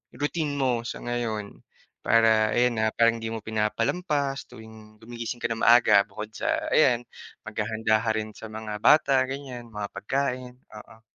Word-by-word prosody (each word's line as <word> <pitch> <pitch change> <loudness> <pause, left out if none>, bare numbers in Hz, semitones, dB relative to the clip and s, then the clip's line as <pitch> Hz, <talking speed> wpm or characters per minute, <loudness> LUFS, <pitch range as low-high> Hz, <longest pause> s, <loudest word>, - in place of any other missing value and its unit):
routine 150 +1 -2
mo 125 -3 0
sa - - -5
ngayon? 115 -4 -4 0.5
Para 110 -1 +4
ayan, 120 -1 +2
ah, 110 0 +1
parang 115 0 +3
hindi 115 0 -5
mo 110 - -5
pinapalampas 135 - -1
tuwing 110 -2 -14
gumigising 120 +1 -6
ka - - -1
ng 115 - -2
maaga 110 -4 +6
bukod 105 +1 -8
sa 320 - -2
ayan, 125 - +4 0.4
maghahanda 110 -1 0
ka 115 - -2
rin 110 0 -3
sa - - -9
mga 110 -1 -6
bata 135 -1 +4
ganiyan, 130 -3 -7
mga 105 -1 -4
pagkain, 125 +4 -2 0.2
oo. 110 +1 -14
115 Hz, 155 wpm, -26 LUFS, 110-130 Hz, 0.5 s, maaga